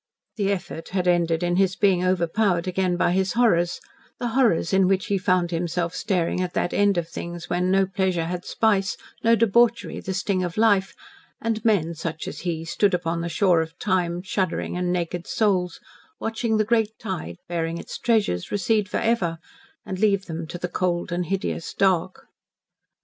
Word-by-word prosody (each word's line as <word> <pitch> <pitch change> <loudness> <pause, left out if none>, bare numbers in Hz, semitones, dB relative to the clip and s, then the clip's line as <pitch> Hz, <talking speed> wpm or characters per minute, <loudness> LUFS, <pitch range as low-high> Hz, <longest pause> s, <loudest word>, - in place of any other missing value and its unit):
The 200 -2 0
effort 170 -3 -5
had 180 -1 0
ended 170 -1 +2
in 175 0 +1
his 190 -1 +2
being 185 -2 +3
overpowered 185 0 +1
again 185 -1 0
by 175 - +2
his 190 +1 +1
horrors 180 -8 +2 0.4
the 240 - -2
horrors 225 -9 +2
in 190 -1 +4
which 190 0 +1
he 200 - 0
found 180 -1 +1
himself 170 0 -1
staring 180 -3 0
at 180 -1 -3
that 175 - 0
end 205 -2 +3
of 170 -1 -1
things 170 0 -7
when 180 +1 +1
no 195 +1 +4
pleasure 185 -3 0
had 175 +1 -4
spice, 205 -4 +1 0.3
no 230 0 +5
debauchery 235 +2 +2
the 190 - -4
sting 195 -1 0
of 175 +1 -4
life, 205 -3 +3 0.4
and 225 -1 -2
men, 185 -7 +2
such 160 0 -5
as - - -6
he, 165 -2 -3
stood 195 +3 +2
upon 170 -1 -2
the 170 - -3
shore 175 0 +3
of 160 +2 -6
time 180 -3 0
shuddering 190 -2 -2
and 180 0 -1
naked 175 -1 -2
souls, 185 -5 0 0.4
watching 225 0 -1
the 215 - +2
great 220 -1 +1
tide, 175 - -5
bearing 165 -1 -2
its - - -7
treasures, 215 - +1
recede 205 +1 +1
forever, 195 -9 0 0.5
and 185 -1 -5
leave 200 -2 +2
them 165 -1 -5
to 175 - -6
the 180 - -3
cold 175 -1 -1
and 175 0 -1
hideous 190 -2 -3
dark. 185 -2 +1
185 Hz, 180 wpm, -24 LUFS, 170-200 Hz, 0.5 s, no